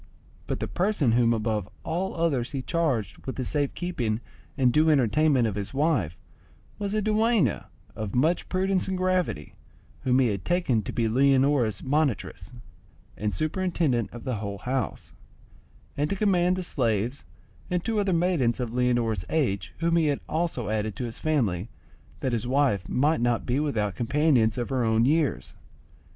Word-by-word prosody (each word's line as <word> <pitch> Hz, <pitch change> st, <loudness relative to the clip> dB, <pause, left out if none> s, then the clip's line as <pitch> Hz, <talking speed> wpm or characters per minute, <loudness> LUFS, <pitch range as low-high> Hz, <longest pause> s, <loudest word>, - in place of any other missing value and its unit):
But -, -, -2 dB
the -, -, -2 dB
person 180 Hz, -, +1 dB
whom 115 Hz, 0 st, +3 dB
above 110 Hz, -3 st, -1 dB
all 180 Hz, +4 st, -2 dB
others 150 Hz, -8 st, 0 dB
he 135 Hz, -2 st, -3 dB
charged 130 Hz, -, -1 dB
with 130 Hz, -, -3 dB
the 130 Hz, -, -3 dB
safe 145 Hz, 0 st, -1 dB
keeping 120 Hz, -12 st, -2 dB, 0.4 s
and 125 Hz, -3 st, +3 dB
due 155 Hz, +1 st, +4 dB
entertainment 140 Hz, -1 st, +3 dB
of 110 Hz, -, -1 dB
his 100 Hz, +5 st, -5 dB
wife 135 Hz, -, +1 dB, 0.6 s
was 200 Hz, 0 st, -2 dB
a 215 Hz, -, +1 dB
dueña 215 Hz, -, +2 dB, 0.3 s
of 105 Hz, -3 st, -4 dB
much 155 Hz, +8 st, +1 dB
prudence 190 Hz, 0 st, 0 dB
and 190 Hz, -1 st, -1 dB
gravity, 185 Hz, -, -1 dB, 0.5 s
whom 125 Hz, -1 st, +3 dB
he 130 Hz, -3 st, +3 dB
had 100 Hz, -3 st, -3 dB
taken 175 Hz, -11 st, +1 dB
to -, -, -6 dB
be 115 Hz, -2 st, 0 dB
Leonora's 130 Hz, -2 st, +2 dB
monitress, 135 Hz, -, -1 dB, 0.6 s
and 105 Hz, 0 st, -2 dB
superintendent 155 Hz, -, 0 dB
of 120 Hz, -, -9 dB
the 130 Hz, -4 st, -2 dB
whole 100 Hz, -1 st, -4 dB
house, 125 Hz, +3 st, -3 dB, 0.8 s
and 145 Hz, +1 st, 0 dB
to -, -, 0 dB
command 185 Hz, -3 st, +2 dB
the 185 Hz, -, -3 dB
slaves 120 Hz, -, -1 dB, 0.5 s
and 180 Hz, -1 st, -1 dB
two 225 Hz, -2 st, 0 dB
other 200 Hz, -2 st, +1 dB
maidens 165 Hz, -9 st, +1 dB
of 120 Hz, -2 st, -3 dB
Leonora's 120 Hz, -5 st, +1 dB
age 100 Hz, -, 0 dB
whom 170 Hz, 0 st, +2 dB
he 160 Hz, -2 st, +3 dB
had 145 Hz, -2 st, 0 dB
also 155 Hz, -, -2 dB
added 110 Hz, -1 st, -1 dB
to -, -, -4 dB
his 115 Hz, -, -7 dB
family, 115 Hz, -, 0 dB, 0.5 s
that 130 Hz, -, -1 dB
his 115 Hz, 0 st, -1 dB
wife 130 Hz, -8 st, +1 dB
might 150 Hz, +2 st, +2 dB
not 120 Hz, -1 st, +1 dB
be 125 Hz, +3 st, 0 dB
without 110 Hz, -10 st, -1 dB
companions 125 Hz, -3 st, +2 dB
of 120 Hz, -, -2 dB
her 130 Hz, -2 st, 0 dB
own 110 Hz, 0 st, +3 dB
years. 150 Hz, +1 st, 0 dB
130 Hz, 165 wpm, -26 LUFS, 115-165 Hz, 0.8 s, due